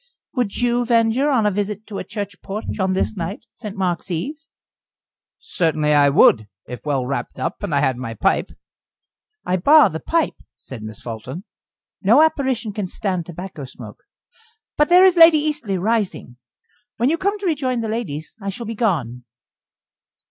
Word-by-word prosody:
"Would 245 -6 -1
you 245 0 +1
venture 235 +3 +2
on 250 -6 +2
a 210 - +3
visit 205 +1 -3
to 205 - -6
a - - -4
church 200 -2 -6
porch 210 +2 -5
on 190 0 +1
this 190 +3 -1
night 190 +6 -5
St. 210 -3 -8
Mark's 180 -1 -2
eve?" 180 - -2 1.0
"Certainly 155 -3 0
I 145 -1 +5
would, 110 -6 +5 0.2
if 125 - -7
well 140 -4 -1
wrapped 140 +2 -4
up, 130 - -3
and 205 -4 -4
I 140 - +2
had 130 -2 +1
my 115 -3 -6
pipe." - - +1 1.0
"I 185 - +1
bar 285 - +6
the 160 - -4
pipe," 330 - 0 0.2
said 130 -5 -10
Miss 110 -1 -9
Fulton. 120 - -7 0.6
"No 230 +10 +6
apparition 260 -8 0
can 200 -2 -3
stand 185 -3 -3
tobacco 175 -3 -8
smoke. 130 - -11 0.7
But 295 - +2
there 360 +2 +7
is 370 -2 +4
Lady 330 -1 +8
Eastleigh 295 -10 -1
rising. 205 - -1 0.6
When 245 +5 +2
you 330 - 0
come 405 +2 0
to 405 - -7
rejoin 265 -8 0
the 225 - -3
ladies, 210 -10 -4
I 200 - -3
shall 235 +4 -6
be 225 - -4
gone." 140 - -1
200 Hz, 170 wpm, -21 LUFS, 160-245 Hz, 1.0 s, Lady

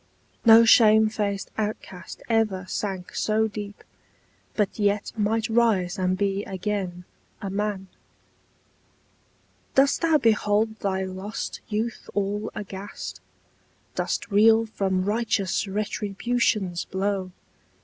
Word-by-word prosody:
No 230 0 +8
shame 220 -1 +6
faced 200 -3 -3
outcast 205 -4 -5
ever 215 -5 +1
sank 190 -2 -4
so 220 +1 +1
deep, 205 -1 -8 0.7
But 210 0 -1
yet 205 0 +1
might 220 +1 0
rise 220 -6 +2
and 185 0 +1
be 200 0 0
again 190 -2 -4 0.3
a 195 - -5
man! 205 -1 -2 1.9
Dost 275 +1 +4
thou 325 -2 +4
behold 220 -3 +1
thy 190 -1 -1
lost 190 +3 -5
youth 220 +2 -3
all 205 +2 -1
aghast? 200 0 -7 0.7
Dost - - -2
reel 220 +2 +5
from 190 -4 -1
righteous 210 -2 0
Retribution's 210 -1 -1
blow? 190 -1 -2
205 Hz, 105 wpm, -25 LUFS, 195-220 Hz, 1.9 s, No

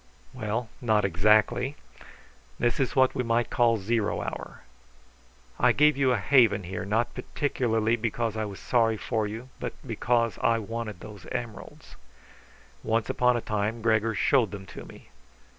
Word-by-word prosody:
"Well, 110 +2 -3
not 110 -4 +2
exactly. 105 - +2 0.8
This 120 -1 0
is 135 - 0
what 130 -1 +4
we 130 - -1
might 115 0 0
call 115 -2 +3
zero 105 +1 -1
hour. - - -7 1.0
I - - +4
gave 150 +1 +4
you 135 -2 +2
a 125 - +2
haven 110 -2 +4
here 90 +1 -5
not 115 +4 0
particularly 115 -6 0
because 115 0 -2
I 110 0 -2
was 100 -2 -8
sorry 115 -3 +1
for 110 -1 -1
you, 115 +5 -7
but - - -4
because 115 -2 0
I 115 - +3
wanted 110 -3 -5
those 105 -3 -11
emeralds. 120 -3 -7 0.8
Once 110 0 0
upon 125 -1 +2
a - - -3
time 105 +2 -2
Gregor 110 -1 +2
showed 115 +3 +3
them 100 -1 -8
to - - -9
me. - - -15
115 Hz, 155 wpm, -27 LUFS, 105-120 Hz, 1.0 s, what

